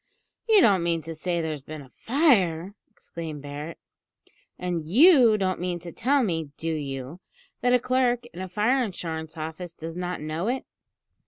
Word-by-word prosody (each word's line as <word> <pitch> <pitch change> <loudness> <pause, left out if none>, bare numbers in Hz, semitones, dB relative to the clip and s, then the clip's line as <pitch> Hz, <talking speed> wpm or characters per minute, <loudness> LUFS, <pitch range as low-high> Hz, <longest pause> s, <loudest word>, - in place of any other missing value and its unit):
"You 430 -3 +7
don't 200 - +5
mean 170 -1 0
to 165 - -6
say 170 +2 -2
there's 155 -3 -3
been 155 +1 -8
a 130 - -18
fire?" 200 - +2 0.2
exclaimed 160 -4 -8
Barret. 145 +3 -7 0.8
"And 180 -3 -2
you 240 - +6
don't 185 -2 -1
mean 180 0 -2
to 170 0 -8
tell 270 +7 +2
me, 165 -7 -1
do 165 0 -2
you, 140 +1 -5 0.4
that 245 - +2
a - - +4
clerk 245 -1 +1
in 180 - -7
a 185 - -5
fire 230 +8 +2
insurance 165 -6 -5
office 160 +2 -6
does 165 +1 -7
not 180 0 -3
know 155 +5 -3
it?" 255 +2 -1
175 Hz, 170 wpm, -26 LUFS, 160-225 Hz, 0.8 s, You